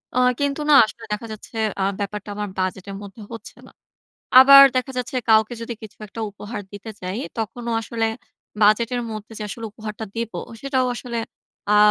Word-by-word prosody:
আ - - +3 0.2
কিন্তু 285 +1 0
না, - - +7
আসলে 225 - -11
দেখা 225 +2 -4
যাচ্ছে 215 +2 -10 0.3
আ - - +2 0.2
ব্যাপারটা 205 +1 -4
আমার 210 -1 -3
বাজেটের 185 +1 -3
মধ্যে 200 +2 -11
হচ্ছে 230 - -10
না। - - -16 0.7
আবার 275 +1 +11
দেখা 255 +1 0
যাচ্ছে, 250 +1 -3
কাউকে 220 +2 +5
যদি 235 +1 -4
কিছু 215 -1 -11
একটা 225 - -10
উপহার 205 +1 -7
দিতে 205 +2 -9
চাই, 185 +4 -4 0.2
তখনও 235 +2 -3
আসলে 225 0 -2 0.6
বাজেটের 235 +4 +3
মধ্যে, 215 +1 -7
যে 210 - -4
আসলে 230 +2 -6
উপহারটা 215 0 -7
দিবো, 230 -1 -3 0.2
সেটাও 265 -2 +1
আসলে 235 -1 -5 0.6
আ - - +5
225 Hz, 170 wpm, -22 LUFS, 210-245 Hz, 0.7 s, আবার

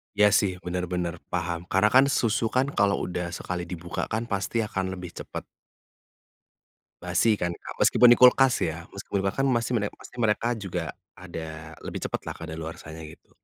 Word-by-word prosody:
Iya 105 0 +5
sih, 100 -2 +3
bener 90 0 -2
bener, 90 -1 -2
paham. 85 0 -2
Karena 95 +3 +3
kan 135 +1 +8
susu 115 -3 +1
kan, 130 +4 +1
kalau 100 -1 +3
udah 90 -1 -3
sekali 90 -1 -4
dibuka 85 -1 -4
kan, 110 +2 -1
pasti 100 +3 0
akan 95 -2 -2
lebih 90 -1 -8
cepet - - -7 1.6
basi, 90 +5 +3
kan, 85 -3 -1
Kak? 85 - -9
Meskipun 125 - +6
di - - +9
kulkas, 125 +1 +7
ya. 85 0 -3
Meskipun 100 0 -3
di - - -2
kulka 120 +8 0
kan 135 - +3
masih 115 -1 0
mere 100 -2 0
masih 125 - -13
mereka 110 +1 +2
juga 100 -5 -4 0.2
ada, 80 0 -8
lebih - - -5
cepet - - -3
lah - - -5
kadaluarsanya, 80 0 -7
gitu. 75 - -14
95 Hz, 180 wpm, -26 LUFS, 85-110 Hz, 1.6 s, di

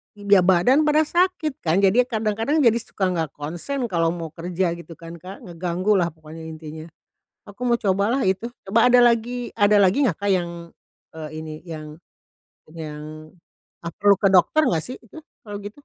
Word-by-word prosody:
iga 205 -1 +4
badan 190 - +3
pada 305 +1 +4
sakit 345 -3 0
kan, 175 +4 +1
jadi 240 +6 +4
kadang-kadang 225 +6 0
jadi 235 -1 +4
suka 190 -4 -2
nggak 160 -4 -3
konsen 175 - -5
kalau 165 -1 +1
mau 165 -3 -6
kerja 175 +1 -2
gitu 170 -1 -9
kan, 170 0 -11
Kak, 185 +4 -11
ngeganggu 180 +3 -2
lah 175 - +1
pokoknya, 160 0 -12
intinya. 155 0 -9 0.6
Aku 205 +4 -12
mau 235 0 +2
cobalah 205 +6 +1
itu, 190 +5 -1 0.2
coba 230 +5 +4
ada 250 - +6
lagi 240 +1 0
ada 205 -1 +4
lagi 200 +8 +3
nggak, 165 - -2
Kak, 200 0 -1
yang, 175 -2 -1 0.6
eee, 155 -1 -7
ini, 155 -1 -7
yang 155 -3 -9 0.8
yang 155 -1 -8 0.6
ah, 170 - -5
perlu 200 +2 +3
ke 195 -2 +3
dokter 195 - +4
nggak 165 - +1
sih 255 - -7
itu, 230 +7 -12 0.2
kalau 205 -2 -7
gitu? 205 +1 -7
190 Hz, 175 wpm, -22 LUFS, 165-230 Hz, 0.8 s, ada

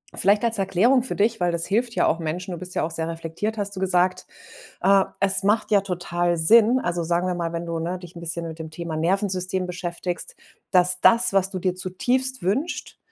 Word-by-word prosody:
vielleicht 205 +4 +3
als 230 -2 +1
Erklärung 225 +7 +3
für - - -4
dich, 225 +1 +1
weil 175 -1 +1
das 170 0 -2
hilft 230 +3 0
ja - - +2
auch 165 - +1
Menschen, 175 +4 -4
du 175 - -4
bist 180 +2 -8
ja - - 0
auch 165 - -3
sehr 165 0 -3
reflektiert, 165 +7 -4
hast 200 0 -3
du - - -5
gesagt. 185 -1 +1 0.6
Ah, 195 +1 +3
es 195 0 +2
macht 210 +3 +1
ja 200 -2 +5
total 175 -2 -1
Sinn, 230 +8 +5
also, 175 -1 -2
sagen 175 +2 0
wir 180 - -1
mal, 170 -1 -3
wenn 170 0 -4
du, 165 0 -3
ne, 175 +2 -3
dich 175 -1 -13
'n 170 - -9
bisschen 170 0 -1
mit 160 0 -8
dem 160 -1 -7
Thema 160 -1 -5
Nervensystem 185 +1 0
beschäftigst, 180 - -4 0.4
dass 180 0 +3
das, 235 +1 +5
was 195 0 +1
du 185 - -4
dir 185 0 -1
zutiefst 250 +8 0
wünscht, 245 - -2
185 Hz, 220 wpm, -23 LUFS, 170-205 Hz, 0.6 s, ja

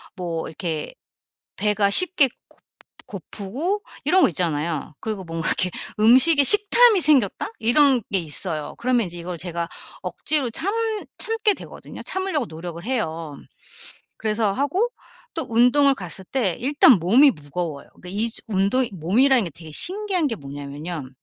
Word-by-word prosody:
뭐 170 -4 -4
이렇게 160 - -5 0.6
배가 210 -1 +1
쉽게 360 - +4 0.2
고 - - -24 0.5
고프고 220 - -4 0.2
이런 375 +1 +4
거 - - +5
있잖아요. 160 -2 -2
그리고 215 -3 -4
뭔가 165 0 -4
이렇게 180 - 0 0.3
'음식에 260 +7 +6
식탐이 415 - +6
생겼다.' 270 - +2
이런 255 +1 +4
게 195 - +3
있어요. 155 -1 -4
그러면 240 -3 +1
이제 175 0 -10
이걸 175 +1 -6
제가 170 -1 -4 0.4
억지로 295 -5 -1
참 365 - -2 0.5
참게 445 -2 0
되거든요. - - -11
참으려고 375 -8 -2
노력을 170 +1 -8
해요. 165 - -3 0.8
그래서 215 -2 0
하고 300 - 0 0.5
또 325 - -2
운동을 250 +5 +4
갔을 190 -2 -7
때 210 -6 -1
일단 275 0 +5
몸이 240 - +5
무거워요. 150 - -6
그러니까 180 - -11
2 215 +4 -1
주 - - -8
운동이 215 +5 +1
몸이라는 230 - +3
게 - - -4
되게 160 +1 -12
신기한 370 - -1
게 235 - -3
뭐냐면요 145 0 -7
215 Hz, 320 characters per minute, -22 LUFS, 170-280 Hz, 0.8 s, 음식에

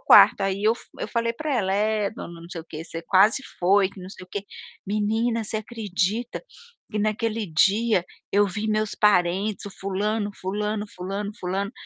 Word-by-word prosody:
quarto, - - +8
aí 195 +1 0
eu 220 - +5
fu - - -13 0.2
eu - - -3
falei 230 -1 0
pra 300 +3 -2
ela: 190 -4 +1
"É, 210 0 +1
dona 170 -7 -9
não 170 - -11
sei 170 - -5
o - - -13
quê, 155 +1 -6
você 165 0 -6
quase 200 +9 +4 0.2
foi, 195 +2 +4
que 190 - -12
não 180 - -8
sei 185 - -10
o 185 - -24
quê", 200 -1 -4 0.4
"Menina, 220 +3 0
você 215 +1 -2
acredita 215 +1 -2 0.5
que 215 - -2
naquele 215 +1 0
dia 195 +4 +3 0.3
eu 205 +1 +5
vi 210 +3 -3
meus 215 0 0
parentes, 195 0 +2
o 205 - -6
fulano, 205 +2 -2
fulano, 210 +2 -2
fulano, 195 +3 -3
fulano, 195 +3 -2
205 Hz, 185 wpm, -25 LUFS, 190-220 Hz, 0.5 s, quarto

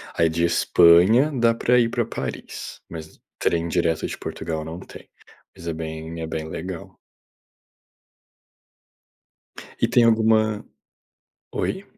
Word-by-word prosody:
Aí 85 -1 +3
de 85 +1 -1
Espanha 90 - +5
dá 120 -3 +2
para 125 +1 +3
ir 115 -1 +2
para 120 -1 -1
Paris, 115 - -6
mas 80 -2 -10 0.2
trem 85 0 0
direto 85 -2 0
de - - -5
Portugal 80 -1 -5
não 80 +3 -7
tem, - - -13 0.5
mas 85 - -11
é 85 - -1
bem 80 +1 -6
é 80 - -4
bem 80 0 -4
legal. 85 +2 -7 2.8
E - - +3
tem 120 - +4
alguma, 110 -2 +3 0.9
oi? - - -3
85 Hz, 125 wpm, -23 LUFS, 80-115 Hz, 2.8 s, Espanha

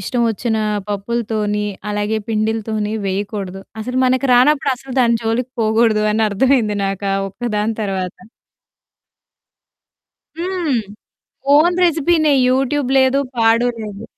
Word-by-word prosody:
ఇష్టవొచ్చిన 230 +1 -1 0.3
పప్పులతోని 210 0 -2 0.3
అలాగే 210 +1 -1
పిండిలతోని 215 -1 -1
వేయకూడదు. 195 -1 -4 0.2
అసలు 250 +3 -3
మనకు 260 +1 +1
రానప్పుడు 275 +2 +4
అసలు 265 0 -9
దాని 235 -1 +3
జోలికి 235 +3 -1
పోకూడదు 220 -1 +2
అని 220 +1 +2
అర్థమైంది 215 0 +2
నాకు 195 +1 -3
ఆ - - +1
ఒక్కదాని 215 +1 -2
తర్వాత. 190 -2 -3 2.2
హ్మ్. 340 -7 -1 0.8
ఓన్ 340 +4 +4
రెసిపీనే, 320 -2 +3 0.2
యూట్యూబ్ 270 +1 0
లేదు. 265 +1 +3 0.2
పాడు 230 +2 +3
లేదు. 210 0 -7
225 Hz, 105 wpm, -18 LUFS, 210-260 Hz, 2.2 s, రానప్పుడు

